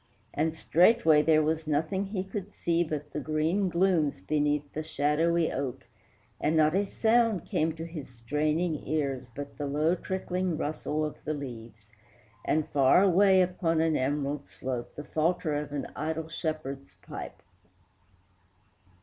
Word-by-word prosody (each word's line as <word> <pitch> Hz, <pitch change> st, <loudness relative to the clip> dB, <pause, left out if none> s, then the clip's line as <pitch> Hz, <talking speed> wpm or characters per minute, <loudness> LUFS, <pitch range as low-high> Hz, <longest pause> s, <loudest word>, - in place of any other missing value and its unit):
And 160 Hz, +2 st, 0 dB
straightway 165 Hz, -2 st, +4 dB
there 155 Hz, 0 st, +4 dB
was 155 Hz, +1 st, -1 dB
nothing 160 Hz, +6 st, 0 dB
he 195 Hz, -2 st, -3 dB
could 195 Hz, +1 st, -7 dB
see 170 Hz, 0 st, +1 dB
But 150 Hz, -2 st, -5 dB
the -, -, -2 dB
green 160 Hz, +6 st, 0 dB
glooms 170 Hz, -, +2 dB
beneath 145 Hz, +6 st, 0 dB
the 155 Hz, -, -3 dB
shadowy 160 Hz, +2 st, +1 dB
oak, 135 Hz, -1 st, -4 dB, 0.5 s
And 155 Hz, +2 st, +1 dB
not 155 Hz, 0 st, +4 dB
a 200 Hz, +1 st, +1 dB
sound 225 Hz, -3 st, +2 dB
came 160 Hz, +1 st, 0 dB
to 165 Hz, 0 st, -6 dB
his 165 Hz, -5 st, -8 dB
straining 150 Hz, +7 st, -1 dB
ears 135 Hz, -4 st, -1 dB
But 140 Hz, 0 st, -7 dB
the 145 Hz, -, -2 dB
low 150 Hz, +4 st, +2 dB
trickling 185 Hz, -2 st, -2 dB
rustle 155 Hz, 0 st, -2 dB
of 150 Hz, -, -7 dB
the 155 Hz, -, -2 dB
leaves, 115 Hz, -6 st, -8 dB, 0.6 s
And 155 Hz, 0 st, +1 dB
far 140 Hz, +6 st, +5 dB
away 190 Hz, 0 st, +5 dB
upon 175 Hz, -2 st, 0 dB
an 160 Hz, -1 st, +2 dB
emerald 140 Hz, +1 st, -1 dB
slope 125 Hz, -2 st, -5 dB
The 150 Hz, -, -6 dB
falter 160 Hz, +1 st, 0 dB
of 145 Hz, -1 st, -3 dB
an 145 Hz, -1 st, -3 dB
idle 160 Hz, +1 st, -3 dB
shepherd's 155 Hz, -4 st, -4 dB
pipe. -, -, -8 dB
155 Hz, 150 wpm, -29 LUFS, 145-170 Hz, 0.6 s, far